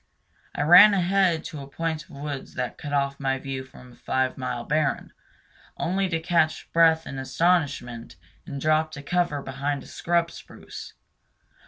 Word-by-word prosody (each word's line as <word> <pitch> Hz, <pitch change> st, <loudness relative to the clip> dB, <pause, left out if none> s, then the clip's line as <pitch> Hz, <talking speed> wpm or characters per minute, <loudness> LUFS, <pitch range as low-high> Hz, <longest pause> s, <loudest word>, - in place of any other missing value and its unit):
I 145 Hz, -, 0 dB
ran 180 Hz, +6 st, +9 dB
ahead 185 Hz, -3 st, +2 dB
to 150 Hz, -3 st, -7 dB
a 135 Hz, -, -9 dB
point 160 Hz, 0 st, -3 dB
of -, -, -29 dB
woods 140 Hz, -1 st, -7 dB
that 125 Hz, -1 st, -4 dB
cut 145 Hz, -, -6 dB
off 140 Hz, -1 st, 0 dB
my 135 Hz, -1 st, 0 dB
view 135 Hz, 0 st, -5 dB
from 125 Hz, -1 st, -15 dB
a -, -, -17 dB
five 130 Hz, 0 st, -1 dB
mile 125 Hz, -2 st, -4 dB
barren, 150 Hz, +2 st, -1 dB, 0.6 s
only 190 Hz, +2 st, 0 dB
to 165 Hz, -2 st, 0 dB
catch 165 Hz, -1 st, 0 dB
breath 165 Hz, -1 st, +4 dB
in 135 Hz, -, -6 dB
astonishment 135 Hz, -, 0 dB, 0.3 s
and 140 Hz, -5 st, -5 dB
drop 155 Hz, +2 st, +2 dB
to 140 Hz, -1 st, -8 dB
cover 170 Hz, -3 st, 0 dB
behind 140 Hz, +1 st, -3 dB
a -, -, -14 dB
scrub 170 Hz, -1 st, 0 dB
spruce. -, -, -11 dB
150 Hz, 165 wpm, -25 LUFS, 135-170 Hz, 0.6 s, ran